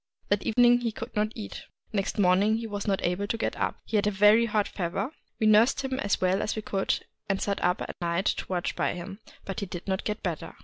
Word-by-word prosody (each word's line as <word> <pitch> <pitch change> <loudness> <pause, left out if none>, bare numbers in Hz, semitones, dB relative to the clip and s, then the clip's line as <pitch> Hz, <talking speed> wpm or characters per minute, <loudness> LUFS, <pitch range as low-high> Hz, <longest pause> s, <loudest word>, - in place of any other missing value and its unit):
That 205 0 +2
evening 245 +1 +5
he 235 -2 -1
could - - -8
not 215 +1 +1
eat. 215 -3 -7 0.3
Next 195 0 -1
morning 200 +3 +4
he 230 - -4
was 205 -2 -4
not 195 -1 0
able 180 +4 0
to 230 - -1
get 225 - -1
up; - - -1
— - - -52
he 220 - 0
had 205 - +2
a - - +5
very 210 +3 +5
hot 210 -2 +1
fever: 195 - -3 0.3
we 220 - +2
nursed 215 +6 +5
him 265 -1 -2
as 200 -6 0
well 185 +2 +2
as - - -1
we 215 - -4
could, 195 -2 -1 0.2
and 195 -1 +1
sat 200 -1 -1
up 180 +1 +1
at - - -8
night 170 +2 0
to - - 0
watch 180 -2 -2
by - - 0
him; 195 +3 -7 0.3
but 195 - -4
he 200 - -4
did 175 +1 -7
not 190 -1 -1
get 210 0 -3
better. 170 -6 -4
205 Hz, 255 wpm, -28 LUFS, 190-215 Hz, 0.3 s, evening